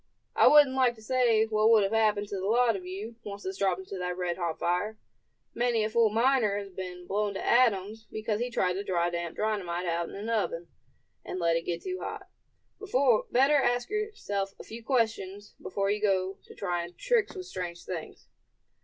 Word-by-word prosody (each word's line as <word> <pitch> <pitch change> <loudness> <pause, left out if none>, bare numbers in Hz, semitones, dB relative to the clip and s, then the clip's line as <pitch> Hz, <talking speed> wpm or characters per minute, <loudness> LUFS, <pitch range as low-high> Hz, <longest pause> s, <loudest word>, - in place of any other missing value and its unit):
I - - +6
wouldn't 295 -3 +7
like 255 -2 +3
to 220 - -16
say 235 -3 +3
what 215 0 +2
would 220 -2 +6
have 195 - 0
happened 215 -2 +2
to - - -4
the 190 - -3
lot 235 +1 +3
of 185 -2 -7
you, 210 +5 -7
once 205 -1 -7
this 190 0 -5
dropped 190 -2 +1
into 190 0 -7
that 180 0 -3
red 175 -1 -1
hot 170 -3 -2
fire. 190 +5 -1 0.6
Many 235 -2 +1
a 215 - -2
fool 230 -1 +4
miner 225 -2 +2
has 200 -1 -6
been 180 -1 -7
blown 205 +1 -1
to - - -4
atoms 220 -3 +2
because 215 -1 -2
he 245 +1 -1
tried 185 -6 +1
to 195 +2 -3
dry 175 -3 0
damp 170 -1 -4
dynamite 185 -5 -1
out 170 0 -1
in - - -9
an 205 +3 -6
oven, 200 -7 -1 0.5
and - - -5
let 170 -1 +2
it 165 - -2
get 170 -1 -3
too 370 0 -4
hot. - - -6 1.1
Better 270 +4 +4
ask 245 +2 +1
yourself 310 - -3
a - - -8
few 230 +1 -9
questions 215 -5 -1
before 200 0 -1
you 210 0 -1
go 190 -2 0
to - - -14
trying 175 -2 -3
tricks 465 -5 +1
with 370 -1 -6
strange 175 - -6
things." 170 -4 -7
205 Hz, 200 wpm, -29 LUFS, 185-230 Hz, 1.1 s, wouldn't